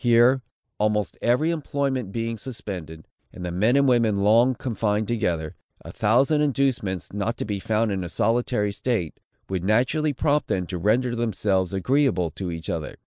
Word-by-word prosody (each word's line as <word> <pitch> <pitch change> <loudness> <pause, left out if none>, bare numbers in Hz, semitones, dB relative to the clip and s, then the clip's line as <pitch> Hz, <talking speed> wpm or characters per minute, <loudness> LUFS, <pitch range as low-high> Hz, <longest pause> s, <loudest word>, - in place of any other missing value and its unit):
Here, 120 +2 +5 0.4
almost 105 0 0
every 135 +8 +2
employment 140 - -2
being 115 +1 -2
suspended, 90 - -7 0.2
and 90 - -8
the 90 - -3
men 105 +8 +2
and 140 0 +4
women 115 -5 +3
long 115 +6 +4
confined 110 -3 -1
together, 85 -10 -1 0.3
a - - -7
thousand 130 +8 +2
inducements, 125 - -1
not 105 +3 -2
to - - -3
be 105 -2 -3
found 110 +2 0
in 95 -2 -2
a 85 - -5
solitary 115 0 0
state, 100 -6 -2 0.3
would 95 -2 -3
naturally 130 - +2
prompt 145 +2 0
them 90 -1 -1
to 90 -1 -5
render 120 +6 +1
themselves 100 -5 0
agreeable 100 - +1
to 95 +4 -5
each 85 -1 -6
other. 80 -2 -4
110 Hz, 165 wpm, -24 LUFS, 95-125 Hz, 0.4 s, Here